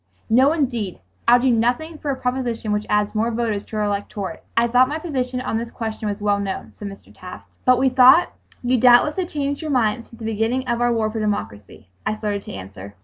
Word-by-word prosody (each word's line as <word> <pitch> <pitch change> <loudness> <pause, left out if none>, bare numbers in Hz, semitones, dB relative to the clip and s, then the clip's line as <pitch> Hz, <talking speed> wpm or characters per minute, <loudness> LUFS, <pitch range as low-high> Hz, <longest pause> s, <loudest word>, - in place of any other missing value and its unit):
"No, 260 +5 +5
indeed! 240 - -1 0.3
I'll 240 +1 +7
do 255 +1 +2
nothing 250 +8 0
for 295 - -4
a 275 - 0
proposition 250 -4 -2
which 210 0 -1
adds 210 0 +1
more 225 +2 +1
voters 225 -3 -2
to - - -9
our 210 - +1
electorate. 205 -1 -4
I 230 - +5
thought 250 +2 +4
my 300 - -2
position 260 -6 -3
on 225 -3 -2
this 230 0 -5
question 220 -2 -4
was 205 0 -5
well 205 -1 +2
known," 195 -1 -5
said 205 - -5
Mr. 195 0 -12
Taft. 180 0 -12
"But 255 0 +5
we 265 +2 +3
thought 260 +6 +6 0.3
you 250 0 +2
doubtless 250 +6 +5
had 360 -2 -2
changed 285 -1 -2
your 315 - -4
mind 230 -4 +1
since 230 - -16
the 225 - -8
beginning 225 +4 -1
of 235 -1 -1
our 240 0 +3
war 220 -2 0
for 220 - -4
democracy——" 110 - -4 0.2
I 215 - -1
started 205 -2 -2
to - - -8
answer. 95 +1 -9
230 Hz, 225 wpm, -21 LUFS, 210-255 Hz, 0.3 s, I'll